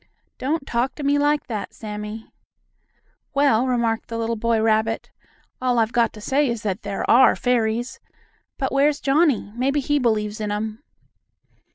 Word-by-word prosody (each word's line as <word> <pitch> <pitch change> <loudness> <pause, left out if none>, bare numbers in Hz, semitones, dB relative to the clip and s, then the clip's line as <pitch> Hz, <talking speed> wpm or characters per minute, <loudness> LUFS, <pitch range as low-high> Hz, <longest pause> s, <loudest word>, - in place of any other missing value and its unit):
"Don't 290 +2 -1
talk 245 +2 -1
to 295 - -7
me 285 +1 +2
like 290 +1 +1
that, 220 -6 -5
Sammie." 210 0 -7 1.0
"Well," 265 -4 +3
remarked 235 -3 0
the 230 - -5
little 230 0 -1
boy 230 0 +1
rabbit, 220 0 0 0.5
"all 250 -1 +1
I've 225 -1 +2
got 235 -1 +2
to 210 - -11
say 275 +5 +1
is 235 -2 -3
that 205 +1 -2
there 200 -2 -4
are 260 +2 +6
fairies! 240 -1 0 0.6
But 265 - -2
where's 285 +2 +2
Johnnie? 275 -7 +2
Maybe 270 +4 +1
he 290 +1 +1
believes 215 -3 0
in 210 -1 -2
'em." 215 +2 -4
235 Hz, 160 wpm, -22 LUFS, 220-275 Hz, 1.0 s, are